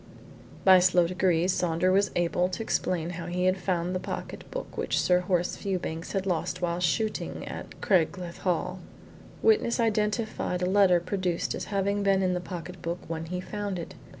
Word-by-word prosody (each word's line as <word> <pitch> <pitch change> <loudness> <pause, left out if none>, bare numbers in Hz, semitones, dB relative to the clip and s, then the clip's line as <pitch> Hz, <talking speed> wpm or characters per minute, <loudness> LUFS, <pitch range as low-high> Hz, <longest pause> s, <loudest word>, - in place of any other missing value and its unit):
By 190 -1 +9
slow 180 -1 +4
degrees 180 0 +2
Saunders 180 +1 +1
was 200 +1 +3
able 175 +1 +1
to 185 +4 -4
explain 175 -5 -1
how 170 -1 -6
he 180 +1 -1
had 185 +1 +2
found 180 -1 -1
the 185 - -1
pocket - - -6
book - - -6
which - - 0
Sir 180 0 +4
Horace 180 -1 0
Fewbanks 175 -4 -3
had 195 -1 -1
lost 180 -1 -1
while 175 -1 -1
shooting 210 +6 -1
at - - -8
Craigleith 175 -1 +1
Hall. 180 0 -1 0.6
Witness 430 - +3
identified 215 -4 0
a - - +3
letter 185 -2 +5
produced 180 -1 -1
as - - -4
having 200 0 0
been 195 -1 +3
in 185 -1 +2
the 180 - -1
pocket 180 -1 -7
book 170 0 -2
when 165 0 -4
he 180 +2 -4
found 205 0 -4
it. 170 - -6
180 Hz, 175 wpm, -28 LUFS, 175-195 Hz, 0.6 s, By